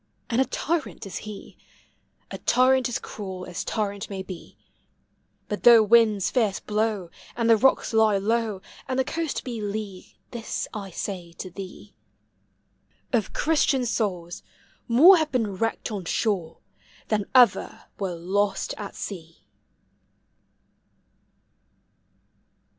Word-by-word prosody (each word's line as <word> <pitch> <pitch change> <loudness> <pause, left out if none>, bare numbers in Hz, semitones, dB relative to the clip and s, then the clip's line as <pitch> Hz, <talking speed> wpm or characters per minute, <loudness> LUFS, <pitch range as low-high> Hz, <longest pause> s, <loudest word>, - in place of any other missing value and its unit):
And 235 +3 +3
a - - +3
tyrant 320 -4 -3
is 195 - -6
he, 205 - -10 0.3
— - - -42
A - - -6
tyrant 255 +1 +3
as 240 - -1
cruel 190 -3 -7
as 180 0 -5
tyrant 205 -3 -3
may 195 -2 -5
be; 185 -2 -10 0.9
But 210 - -4
though 235 -2 +8
winds 215 -3 +4
fierce 220 -6 +1
blow, 210 -4 -1 0.2
And 235 -1 0
the 230 - +7
rocks 255 +1 +2
lie 220 -2 +4
low, 215 -1 -1 0.2
And 260 - -2
the 265 - +3
coast 325 +2 -3
be 235 -4 -5
lee, 205 -2 -6
This 235 -2 -4
I 200 -2 -6
say 175 -2 -6
to 185 +2 -8
thee: 195 +2 -10 1.2
Of 220 -5 0
Christian 290 -4 +2
souls 190 -6 -2 0.5
more 315 +11 +8
have 315 -2 -1
been 225 -6 0
wrecked 225 +2 -2
on 200 -4 -4
shore 175 -4 -1 0.5
Than 210 -2 +1
ever 245 -6 +4 0.2
were 190 -3 -2
lost 195 +4 -1
at 205 - -7
sea! 165 -5 -8
210 Hz, 130 wpm, -25 LUFS, 195-235 Hz, 1.2 s, though